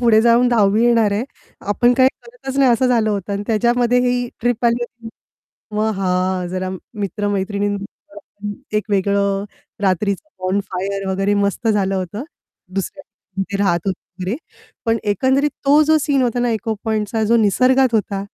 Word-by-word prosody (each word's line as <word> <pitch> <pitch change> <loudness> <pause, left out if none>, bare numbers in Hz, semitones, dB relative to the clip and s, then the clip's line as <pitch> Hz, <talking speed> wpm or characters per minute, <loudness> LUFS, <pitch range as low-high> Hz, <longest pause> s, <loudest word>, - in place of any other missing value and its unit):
पुढे 230 -3 +5
जाऊन 235 +1 +4
10वी 215 -1 +3
येणार 230 -4 +3
आहे. 215 +5 -1 0.5
आपण 240 +4 +3
काही 260 0 +5 0.2
करतच 470 - -8
नाही, 270 -2 +5
असं 235 +2 +2
झालं 225 -3 +2
होतं 200 -1 -3
आणि 200 0 -2
त्याच्यामध्ये 240 +2 +2
ही 245 0 0
ट्रिप 245 0 0
आली 235 +1 +2
होती 240 -1 -8 0.7
मग 215 +1 +1
हां. 185 -1 0
जरा 185 0 -3 0.2
मित्र-मैत्रिणीं 205 0 -2
बरोबरपण 205 +1 -10 0.2
एक 210 - -1
वेगळं, 200 0 +1 0.4
रात्रीचं 195 - 0 0.2
बॉन 185 +2 +1
फायर 195 +1 -3
वगैरे 195 +2 +1
मस्त 210 +3 -2
झालं 195 -3 +1
होतं. 190 +6 -4 0.5
दुसऱ्या 195 +9 -4
रूममधे 195 +2 -6
राहत 175 -3 +2
होतो 190 - -2 0.2
वगैरे 185 +6 -1 0.5
पण 225 0 +2 0.2
एकंदरीत 265 +7 +2 0.2
तो 290 +2 +6
जो 315 +1 +4
सीन 280 -2 +1
होता 245 -1 0
ना 240 -1 +1
इको 220 0 -1
पॉइंटचा 220 0 -1
जो 230 +2 +3
निसर्गात 255 +4 +3
होता 205 -2 0
215 Hz, 160 wpm, -19 LUFS, 195-240 Hz, 0.7 s, तो